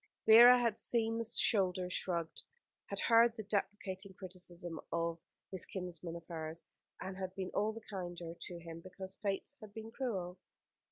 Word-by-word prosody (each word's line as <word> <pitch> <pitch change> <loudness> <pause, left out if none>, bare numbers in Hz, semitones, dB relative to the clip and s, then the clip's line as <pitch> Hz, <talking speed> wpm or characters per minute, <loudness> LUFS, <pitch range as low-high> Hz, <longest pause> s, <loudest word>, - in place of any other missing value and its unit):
Vera 240 +3 +10
had 230 -3 +1
seen 225 -1 +1
the - - 0
shoulders 185 -5 +2
shrugged, 170 -3 -2 0.5
and - - -3
had - - 0
heard 230 0 +6
the 220 - -5
deprecating 195 -1 -3
criticism 175 -2 -7
of 170 0 0 0.3
this 190 - -1
kinsman 175 -3 -5
of 170 -1 -8
hers, 160 -1 -6 0.4
and 190 0 -5
had 185 -1 -4
been 190 -1 -3
all 210 +2 +2
the 225 +1 -8
kinder 175 -4 -5
to 175 - -6
him 165 -1 -8
because 190 +1 -7
Fate 200 +7 -2
had 210 -1 -11
been 220 0 -7
cruel. 190 -8 -3
190 Hz, 165 wpm, -35 LUFS, 175-220 Hz, 0.5 s, Vera